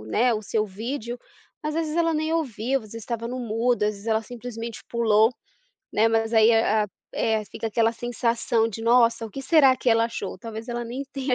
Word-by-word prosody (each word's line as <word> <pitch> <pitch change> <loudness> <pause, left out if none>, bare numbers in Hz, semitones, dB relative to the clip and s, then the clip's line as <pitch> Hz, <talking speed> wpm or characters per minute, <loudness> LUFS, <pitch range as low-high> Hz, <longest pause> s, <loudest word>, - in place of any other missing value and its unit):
o - - -11
né, 240 - +2
o 215 - -2
seu 215 +1 0
vídeo, 235 +4 -5 0.4
às 305 0 -2
vezes 320 -1 -1
ela 330 -1 +2
nem 315 +1 -1
ouviu, 265 -5 0
às 220 - -12
vezes 230 0 -7
estava 230 +1 -4
no 255 +1 -4
mudo, 235 0 0
às 210 - +3
vezes 200 +2 -12
ela 220 0 +1
simplesmente 235 0 -7
pulou, 225 -1 +3 0.6
né, 225 +2 +4
mas 225 0 +1
aí 220 0 +6
a 220 -1 +3
a - - -9 0.3
eh, 220 -1 +1
fica 225 - -5
aquela 225 +1 +2
sensação 235 -1 0
de: 225 +1 -7
"Nossa, 230 -1 +4
o - - -12
que 275 - -6
será 275 -3 +5
que 255 - -1
ela 230 0 +4
achou?" 200 -5 -5
Talvez 225 +3 -8
ela 240 0 -3
nem 245 +4 -5
tenha 265 -2 0
230 Hz, 215 wpm, -25 LUFS, 220-250 Hz, 0.6 s, aí